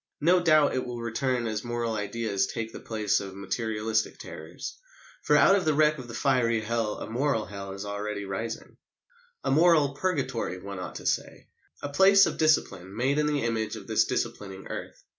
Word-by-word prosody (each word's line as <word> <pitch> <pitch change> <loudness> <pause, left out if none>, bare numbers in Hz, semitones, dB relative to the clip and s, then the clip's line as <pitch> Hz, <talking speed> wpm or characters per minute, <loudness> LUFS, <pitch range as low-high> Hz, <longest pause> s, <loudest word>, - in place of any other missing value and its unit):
No 175 +4 +5
doubt 155 -3 +4
it 130 - -1
will 120 -1 -6
return 120 +1 -1
as 110 -2 -2
moral 120 -1 -2
ideas 105 -1 -1
take 115 -1 -5
the - - -7
place 110 -3 0
of 95 -1 -7
materialistic 110 +2 -1
terrors; - - -8 0.4
for - - +4
out 195 - +6
of 195 - +1
the 155 -2 +2
wreck 150 0 +3
of 125 - -8
the 120 - -8
fiery 120 -4 +2
Hell 110 -1 -1
a - - -6
moral 120 -1 0
Hell 100 -1 -7
is 100 +1 -6
already 100 0 -4
rising. 110 +4 -5 0.7
A - - 0
moral 155 -2 +4
Purgatory, 135 - -2
one 100 +1 -7
ought 90 -6 -6
to - - -8
say - - -2 0.3
a 145 - -2
place 195 +6 +6
of - - -3
discipline 100 - +1
made 135 +6 +1
in 150 - +2
the 145 -3 0
image 110 -1 -1
of 105 -3 -9
this - - +2
disciplining 95 -2 -4
earth. - - -7
115 Hz, 190 wpm, -27 LUFS, 105-140 Hz, 0.7 s, out